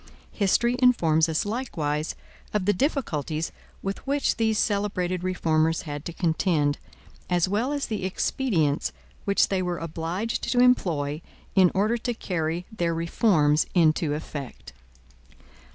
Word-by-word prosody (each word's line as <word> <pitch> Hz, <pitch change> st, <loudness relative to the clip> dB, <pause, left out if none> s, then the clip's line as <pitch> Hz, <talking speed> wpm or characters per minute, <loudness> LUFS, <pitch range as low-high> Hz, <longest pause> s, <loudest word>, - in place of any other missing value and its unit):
History 235 Hz, +4 st, +2 dB
informs 165 Hz, -11 st, +4 dB
us, 160 Hz, +4 st, 0 dB
likewise, 165 Hz, -, -2 dB, 0.4 s
of 200 Hz, -3 st, +1 dB
the 205 Hz, -, +4 dB
difficulties 165 Hz, -, -1 dB, 0.3 s
with 195 Hz, 0 st, -3 dB
which 280 Hz, +1 st, +1 dB
these 220 Hz, -2 st, +1 dB
celebrated 195 Hz, -4 st, 0 dB
reformers 165 Hz, -3 st, +1 dB
had 145 Hz, -1 st, -6 dB
to -, -, -4 dB
contend, 160 Hz, -3 st, +1 dB, 0.5 s
as 175 Hz, 0 st, +2 dB
well 215 Hz, +8 st, 0 dB
as 290 Hz, -1 st, -1 dB
the 215 Hz, -4 st, -3 dB
expedients 185 Hz, -, 0 dB, 0.3 s
which 200 Hz, 0 st, +3 dB
they 190 Hz, -1 st, 0 dB
were 180 Hz, -1 st, -2 dB
obliged 165 Hz, +7 st, -3 dB
to 245 Hz, -, +2 dB
employ 165 Hz, -, +2 dB, 0.3 s
in 185 Hz, -2 st, +6 dB
order 215 Hz, +5 st, +2 dB
to 240 Hz, +1 st, -3 dB
carry 170 Hz, -4 st, -2 dB
their 170 Hz, -6 st, -1 dB
reforms 165 Hz, -3 st, +2 dB
into 155 Hz, -3 st, +3 dB
effect. 140 Hz, -, -7 dB
180 Hz, 130 wpm, -26 LUFS, 160-215 Hz, 0.5 s, in